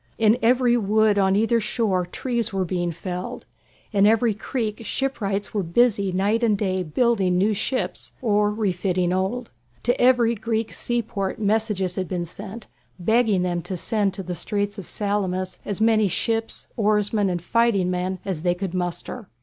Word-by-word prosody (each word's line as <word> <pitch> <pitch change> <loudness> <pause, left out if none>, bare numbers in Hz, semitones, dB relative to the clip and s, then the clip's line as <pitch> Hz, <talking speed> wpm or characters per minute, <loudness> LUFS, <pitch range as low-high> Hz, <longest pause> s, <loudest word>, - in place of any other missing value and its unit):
In 225 +2 +4
every 245 +1 +4
wood 215 -1 +3
on 190 0 +3
either 225 +3 +3
shore 210 -5 0
trees 235 +2 -2
were 190 -1 -1
being 175 -1 -1
felled. 180 +2 -6 0.5
In 200 -1 +4
every 225 +1 +3
creek 215 +1 -3
shipwrights 205 -6 -2
were 210 - +1
busy 200 +2 +2
night 200 +5 +1
and 220 -3 +3
day 190 -2 0
building 190 +1 +1
new 205 +4 +3
ships 235 +5 -3
or 210 -3 +2
refitting 185 -4 0
old. 205 +6 -2 0.3
To 245 - +1
every 245 -2 +4
Greek 225 0 -2
seaport 220 -5 -2
messages 210 -3 0
had 185 -1 -1
been 175 -1 -2
sent, 200 +5 -8 0.3
begging 215 0 +2
them 175 -1 -1
to 185 +1 -5
send 200 0 0
to 195 - -5
the 180 0 -4
Straits 205 +4 -2
of 190 - -8
Salamis 190 -3 -2
as 205 -1 -3
many 220 -1 +4
ships, 225 +5 -2
oarsmen, 210 -1 +1
and 175 -1 -1
fighting 200 -1 +2
men 180 +1 -2
as 185 -5 -3
they 175 0 +1
could 185 -1 -4
muster. 185 +4 -4
205 Hz, 165 wpm, -23 LUFS, 185-225 Hz, 0.5 s, In